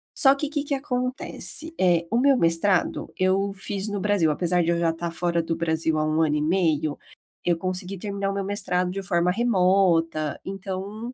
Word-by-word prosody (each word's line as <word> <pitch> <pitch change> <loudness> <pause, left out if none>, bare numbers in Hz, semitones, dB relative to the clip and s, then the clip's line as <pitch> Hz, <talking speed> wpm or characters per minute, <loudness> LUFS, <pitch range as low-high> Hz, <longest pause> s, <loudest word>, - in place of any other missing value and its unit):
Só 270 -2 +5
que, 280 +1 -3
que 295 -1 -2
que 285 - -2
acontece? 265 +4 -3
Eh, 175 -2 +3
o 230 - +2
meu 275 +1 +5
mestrado, 170 +1 +1
eu 195 +2 +1
fiz 195 +1 -3
no 205 -1 -3
Brasil 205 -6 +2
apesar 175 +3 +1
de 165 - -1
eu 170 - +1
já 170 -1 +2
estar 165 +1 -5
fora 170 0 0
do 165 0 -2
Brasil 160 -1 0
há 155 - +1
1 155 +1 +1
ano 150 -2 +2
e 150 - 0
meio, 155 -3 +1 0.5
eu 175 -1 +2
consegui 185 +2 -3
terminar 200 +1 -3
o - - -4
meu 200 0 -2
mestrado 180 -3 0
de 195 +1 -4
forma 175 -1 +1
remota, 180 -8 +2
então, 195 +4 -6
185 Hz, 195 wpm, -24 LUFS, 165-205 Hz, 0.5 s, Só